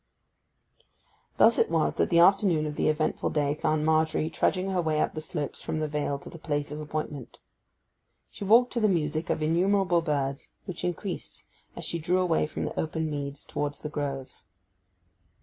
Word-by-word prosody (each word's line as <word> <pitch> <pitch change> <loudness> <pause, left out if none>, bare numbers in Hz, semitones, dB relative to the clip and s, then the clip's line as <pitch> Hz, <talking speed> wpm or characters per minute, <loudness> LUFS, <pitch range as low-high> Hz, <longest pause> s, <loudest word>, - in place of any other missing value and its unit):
Thus 230 0 +6
it - - +3
was 160 -2 +1
that - - +1
the 170 - +3
afternoon 175 -3 +5
of 150 -1 -4
the - - +1
eventful 155 0 0
day 145 -2 +1
found 155 0 0
Margery 160 0 +2
trudging 190 0 0
her 185 -2 +1
way 155 -2 0
up - - +1
the 155 - -4
slopes 150 -2 -4
from - - -3
the 155 0 -1
vale 145 -1 -2
to 140 - -11
the 165 - -10
place 145 -2 -2
of 150 +1 -5
appointment. 150 -3 -5 0.9
She - - -8
walked 235 +5 +5
to 240 - 0
the 215 -2 +3
music 155 -3 0
of 155 - 0
innumerable 180 +2 +2
birds, 140 -4 -2
which 185 -4 -6
increased 180 +1 -4 0.3
as - - -6
she 170 - -2
drew 175 +3 +1
away 175 -4 +2
from - - -4
the - - -4
open 160 0 -2
meads 140 -1 -5
towards 145 -1 -3
the 150 - -4
groves. 140 -3 -4
155 Hz, 185 wpm, -27 LUFS, 150-175 Hz, 0.9 s, Thus